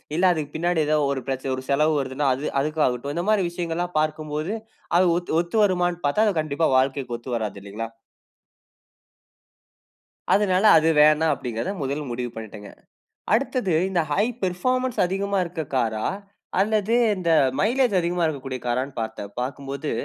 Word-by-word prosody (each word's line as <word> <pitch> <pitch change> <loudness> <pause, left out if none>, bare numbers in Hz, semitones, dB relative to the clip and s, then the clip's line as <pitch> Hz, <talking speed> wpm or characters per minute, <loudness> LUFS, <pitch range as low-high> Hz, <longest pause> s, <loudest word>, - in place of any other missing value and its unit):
இல்ல 175 - 0
அதுக்கு 150 -3 -3
பின்னாடி 175 +1 0
ஏதாவது 150 -2 +2
ஒரு 135 -2 -2
பிரச்ச 130 -1 -3
ஒரு 130 - -7
செலவு 150 +3 +3
வருதுன்னா, 135 +1 -1
அது 140 +4 -4
அதுக்காகட்டும். 145 -3 -1
இந்த 175 - -1
மாரி 210 -3 +3
விஷயங்கள்ல்லாம் 175 0 -3
பார்க்கும்போது, 155 +3 -2 0.4
அது 185 - +5
ஒத்து 175 -2 -4
ஒத்து 175 +5 -7
வருமான்னு 175 -3 +1
பார்த்தா 210 +10 +3
அது 185 -6 +1
கண்டிப்பா 155 +1 0
வாழ்க்கைக்கு 130 -2 0
ஒத்து 120 +1 -5
வராது 105 -3 -3
இல்லிங்களா? 105 +3 -6 2.4
அதுனால 195 -1 +2
அது 160 +1 +3
வேணாம் 155 +1 +5
அப்படிங்கறத 125 - -4
முதல் 140 +3 -2
முடிவு 120 0 -3
பண்ணிட்டேங்க. 110 -2 -9 0.6
அடுத்தது 245 -5 0 0.2
இந்த 180 - +1
ஹை 205 +7 +3 0.2
பெர்ஃபார்மன்ஸ் 255 +8 -1
அதிகமா 195 +2 -1
இருக்க 170 -2 -5
காரா 110 -3 0 0.5
அல்லது 215 +2 +2 0.2
இந்த 175 -3 -1 0.3
மைலேஜ் 240 +1 +2
அதிகமா 175 0 0
இருக்கக்கூடிய 135 -4 -4
காரான்னு 130 +2 -2
பார்த்தேன். 110 -2 -6
பார்க்கும்போது 140 +2 -4
155 Hz, 145 wpm, -24 LUFS, 130-180 Hz, 2.4 s, அது